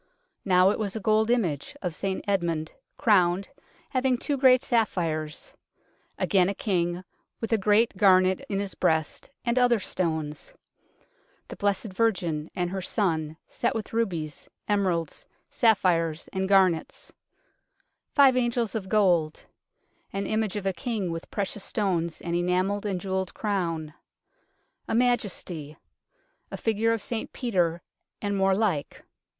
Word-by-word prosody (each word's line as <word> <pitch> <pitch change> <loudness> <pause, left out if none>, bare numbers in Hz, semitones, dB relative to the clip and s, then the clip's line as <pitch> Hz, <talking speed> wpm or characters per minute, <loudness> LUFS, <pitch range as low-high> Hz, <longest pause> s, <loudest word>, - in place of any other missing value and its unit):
Now 185 0 +5
it - - -3
was 205 -2 -2
a - - -2
gold 215 +2 +2
image 190 - 0
of 180 -3 -2
St 190 +2 -3
Edmund, 170 -5 0 0.3
crowned, 190 -3 +3 0.4
having 255 -1 +1
two 290 +4 -2
great 260 -1 +5
sapphires; 165 - -1 0.6
again 190 -3 +3
a 200 - -3
king, 175 -3 -1 0.4
with 225 0 -2
a - - +5
great 210 +3 +3
garnet 185 -1 +4
in 200 - -1
his 200 -1 -3
breast 160 - 0 0.2
and 240 +1 +2
other 245 -1 +4
stones; 160 - -3 1.0
the - - -7
Blessed 200 0 -1
Virgin 180 -8 0
and 175 -1 -1
her 190 0 -3
Son, 160 -6 -1
set - - -1
with 225 -1 -5
rubies, 170 -10 -2 0.2
emeralds, 185 -6 -1 0.2
sapphires 175 -8 +2
and 190 0 -1
garnets; 185 -5 +2 1.0
five 275 -3 +5
angels 240 -3 0
of 195 -4 -4
gold; 175 -7 +2 0.7
an 195 0 -3
image 215 -1 -1
of 205 -2 -4
a 195 - +1
king 195 -1 -3
with 165 0 -6
precious 200 0 -3
stones 175 -6 -1
and 170 -1 -2
enamelled 185 +4 0
and 190 -3 -1
jewelled 190 0 -3
crown; 170 -7 -2 0.9
a - - -1
Majesty; 190 -11 -1 0.7
a - - -6
figure 225 +1 +1
of 225 -3 -1
St 230 -2 -4
Peter, 175 -8 0 0.4
and 205 -1 -2
more 195 0 +3
like. 190 -9 -1
195 Hz, 135 wpm, -26 LUFS, 170-220 Hz, 1.0 s, Now